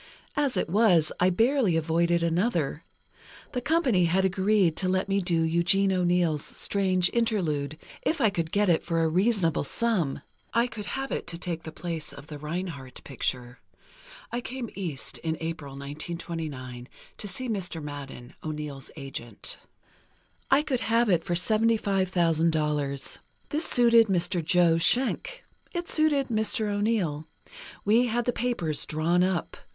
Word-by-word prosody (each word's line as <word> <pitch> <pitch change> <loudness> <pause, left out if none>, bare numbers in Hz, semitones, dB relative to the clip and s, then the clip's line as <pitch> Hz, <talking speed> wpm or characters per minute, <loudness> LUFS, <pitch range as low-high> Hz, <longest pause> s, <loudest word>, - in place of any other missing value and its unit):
As 285 -3 +1
it - - 0
was, 180 -4 +4
I 180 - +4
barely 225 - +3
avoided 170 +1 +1
another: 170 - 0 0.7
The 250 - -2
company 265 - +2
had 190 +3 +2
agreed 190 -2 +2
to 185 - 0
let 185 +1 +1
me 195 0 +1
do 175 -2 +1
Eugene 175 +4 +3
O'Neill's 175 -4 +2
'Strange 185 -3 +1
Interlude,' 165 -11 0 0.2
if 325 - 0
I 220 - +4
could 165 -4 -2
get 205 0 +2
it 170 -3 +3
for 165 -1 0
a - - +3
reasonable 185 -1 +2
sum—I 220 - -1
could 225 -4 -7
have 270 0 -4
it - - -3
to 170 - -4
take 170 -2 -3
the 160 - -8
place 165 -1 -5
of - - -11
the 150 -1 -8
Reinhardt 150 -4 -5
picture. 125 -2 -3 0.7
I 240 - -2
came 245 -2 -6
East 165 -8 -4
in 160 -1 -2
April 160 -4 -5
(1929), 140 -3 -6 0.3
to 205 - -6
see 250 +7 -3
Mr. 190 -7 -3
Madden, 140 -4 -8
O'Neill's 150 -3 -5
agent. 130 -7 -5 0.9
I 275 +2 +5
could 270 -5 -1
have 230 0 +2
it 170 -3 +3
for 175 - -1
$75,000. 170 -9 +1 0.3
This 310 +2 +1
suited 235 -2 +5
Mr. 175 -2 0
Joe 170 0 +4
Schenck. 270 - +1 0.3
It 345 0 -2
suited 295 -4 +2
Mr. 220 -1 +1
O'Neill. 205 -8 0 0.6
We 230 +4 +4
had 240 +1 0
the 245 - +1
papers 200 -13 -1
drawn 165 +3 +2
up. 185 -2 -1
180 Hz, 145 wpm, -27 LUFS, 160-220 Hz, 0.9 s, I